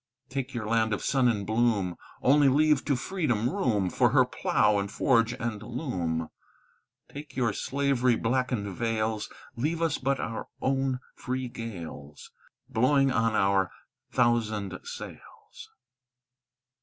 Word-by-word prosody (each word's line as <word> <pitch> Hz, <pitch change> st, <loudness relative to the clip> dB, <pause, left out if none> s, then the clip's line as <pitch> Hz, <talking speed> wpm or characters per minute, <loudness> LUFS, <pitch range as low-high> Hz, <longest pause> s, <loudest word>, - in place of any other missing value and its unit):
"Take 135 Hz, 0 st, -4 dB
your 115 Hz, -3 st, -3 dB
land 110 Hz, 0 st, +2 dB
of -, -, -7 dB
sun 130 Hz, -3 st, +3 dB
and 105 Hz, -4 st, 0 dB
bloom; 110 Hz, -5 st, +1 dB, 0.3 s
Only 140 Hz, +1 st, +5 dB
leave 150 Hz, +1 st, +3 dB
to 140 Hz, -, +2 dB
Freedom 125 Hz, -, -1 dB
room 115 Hz, -, 0 dB
For -, -, +3 dB
her -, -, +5 dB
plough, 105 Hz, -1 st, +2 dB
and 100 Hz, 0 st, -3 dB
forge, 115 Hz, -3 st, +3 dB
and 115 Hz, -4 st, -4 dB
loom; 90 Hz, -, -3 dB, 0.8 s
"Take 145 Hz, +1 st, -10 dB
your 120 Hz, -5 st, +1 dB
slavery 130 Hz, -2 st, +1 dB
blackened 125 Hz, -2 st, 0 dB
vales; 110 Hz, -1 st, -1 dB, 0.3 s
Leave 155 Hz, +7 st, -1 dB
us 165 Hz, -3 st, 0 dB
but 135 Hz, +1 st, 0 dB
our 115 Hz, -, -4 dB
own 135 Hz, -1 st, 0 dB
free 130 Hz, 0 st, -3 dB
gales, 85 Hz, -11 st, -8 dB, 0.4 s
Blowing 135 Hz, +3 st, +3 dB
on 115 Hz, -2 st, +1 dB
our 95 Hz, -2 st, +3 dB, 0.4 s
thousand 110 Hz, -5 st, +1 dB
sails. -, -, -10 dB
120 Hz, 130 wpm, -28 LUFS, 105-135 Hz, 0.8 s, Only